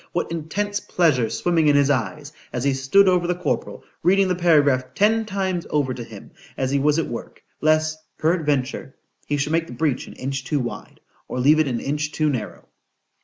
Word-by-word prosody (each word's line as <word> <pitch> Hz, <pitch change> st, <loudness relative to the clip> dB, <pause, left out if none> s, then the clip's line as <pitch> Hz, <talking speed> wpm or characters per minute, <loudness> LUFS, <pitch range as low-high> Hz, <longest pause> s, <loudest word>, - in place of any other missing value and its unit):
What 175 Hz, -, -2 dB
intense 205 Hz, +6 st, -2 dB
pleasure 150 Hz, -, +1 dB
swimming 165 Hz, +1 st, +1 dB
in 145 Hz, -, +5 dB
his 145 Hz, 0 st, +4 dB
eye 130 Hz, +3 st, -1 dB, 0.3 s
as 125 Hz, -, -3 dB
he 140 Hz, 0 st, +2 dB
stood 135 Hz, +10 st, +4 dB
over 180 Hz, -2 st, +3 dB
the 180 Hz, -, 0 dB
corporal, 180 Hz, -, -3 dB, 0.2 s
reading 190 Hz, +2 st, +3 dB
the 180 Hz, -, +1 dB
paragraph 145 Hz, -7 st, +2 dB
ten 220 Hz, +2 st, +3 dB
times 190 Hz, -4 st, -2 dB
over 140 Hz, -4 st, 0 dB
to 125 Hz, -, -6 dB
him, -, -, -12 dB, 0.3 s
as 130 Hz, 0 st, -1 dB
he 140 Hz, -, +2 dB
was 150 Hz, +2 st, +2 dB
at 165 Hz, -, +1 dB
work, 120 Hz, -, -8 dB, 0.2 s
lest, 155 Hz, 0 st, +2 dB, 0.2 s
peradventure, 150 Hz, -5 st, -1 dB, 0.3 s
he 145 Hz, -, 0 dB
should 140 Hz, +2 st, -1 dB
make 165 Hz, 0 st, +1 dB
the -, -, -9 dB
breach 130 Hz, +1 st, -1 dB
an -, -, -10 dB
inch 135 Hz, 0 st, -4 dB
too 140 Hz, +2 st, -1 dB
wide,—or 125 Hz, 0 st, -7 dB
leave 150 Hz, +5 st, +5 dB
it 155 Hz, -, +3 dB
an 120 Hz, -3 st, -1 dB
inch 150 Hz, +1 st, -2 dB
too 155 Hz, -1 st, +1 dB
narrow. 115 Hz, -6 st, -5 dB
150 Hz, 195 wpm, -22 LUFS, 135-175 Hz, 0.3 s, in